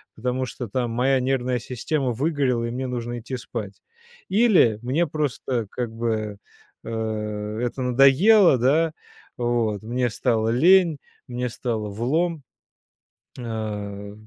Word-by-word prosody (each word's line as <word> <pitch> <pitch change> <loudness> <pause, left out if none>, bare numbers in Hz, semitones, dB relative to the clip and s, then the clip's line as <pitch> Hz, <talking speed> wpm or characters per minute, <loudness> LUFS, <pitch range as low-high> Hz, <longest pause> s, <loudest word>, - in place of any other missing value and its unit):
потому 125 +3 -2
что 125 -1 -6
там 120 0 -1
моя 130 +3 +2
нервная 125 -1 0
система 130 +3 -2
выгорела 130 -3 0
и 115 - -3
мне 130 +1 -3
нужно 120 -1 -4
идти 125 +3 -5
спать. 110 -5 -7 0.5
Или 190 - +4
мне 145 +8 0
просто 130 -6 -2
как 120 -3 -4
бы, 110 -3 -2 0.5
э, - - -6 0.7
это 125 +2 -2
надоело, 135 - +5
да? 155 +6 +2 0.4
Вот, 115 -4 0
мне 120 +2 -1
стало 110 0 0
лень, 170 +5 +5 0.3
мне 125 0 -2
стало 115 -3 -3
влом". 150 - -1 1.0
А, 105 -3 -5
125 Hz, 120 wpm, -24 LUFS, 115-135 Hz, 1.0 s, надоело